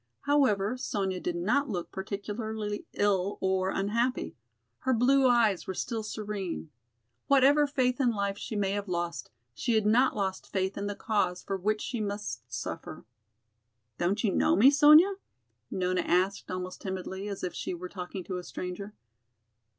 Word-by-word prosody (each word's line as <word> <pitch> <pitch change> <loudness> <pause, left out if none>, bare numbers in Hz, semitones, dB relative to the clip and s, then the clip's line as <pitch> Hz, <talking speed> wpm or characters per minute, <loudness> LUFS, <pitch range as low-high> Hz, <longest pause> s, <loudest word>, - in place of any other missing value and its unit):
However, 255 -6 +2
Sonya 195 -7 -2
did 175 -1 -3
not 245 +12 +1
look 180 -5 -4
particularly 210 +2 -4
ill 200 -1 +1
or 190 0 +1
unhappy; 230 +6 -1 0.4
her 260 -1 +1
blue 265 +3 +4
eyes 225 -6 +3
were 190 - -3
still 230 +2 -2
serene. 205 -7 -5 0.6
Whatever 280 +2 +5
faith 255 -2 +1
in 250 - +4
life 200 -3 -1
she 215 - -6
may 200 -2 0
have 205 0 -2
lost, 175 -6 -3 0.2
she 235 - 0
had 215 -1 +2
not 245 +5 +4
lost 190 -2 -3
faith 190 0 -1
in 200 0 -3
the 205 - -3
cause 195 -5 0
for 195 - -2
which 210 +3 0
she 240 -3 -3
must 200 - -4
suffer. 110 +1 -6 0.9
"Don't 195 +5 0
you 200 -5 +2
know - - +3
me, 250 +8 +7
Sonya?" 305 +7 +7 0.5
Nona 185 0 0
asked 185 +3 +1
almost 185 0 -5
timidly, 190 +1 -4
as 200 -2 -5
if 180 - -2
she - - -4
were 180 +1 -6
talking 180 0 -6
to 185 +1 -4
a 180 - -6
stranger. 190 +4 -6
205 Hz, 160 wpm, -29 LUFS, 185-235 Hz, 0.9 s, me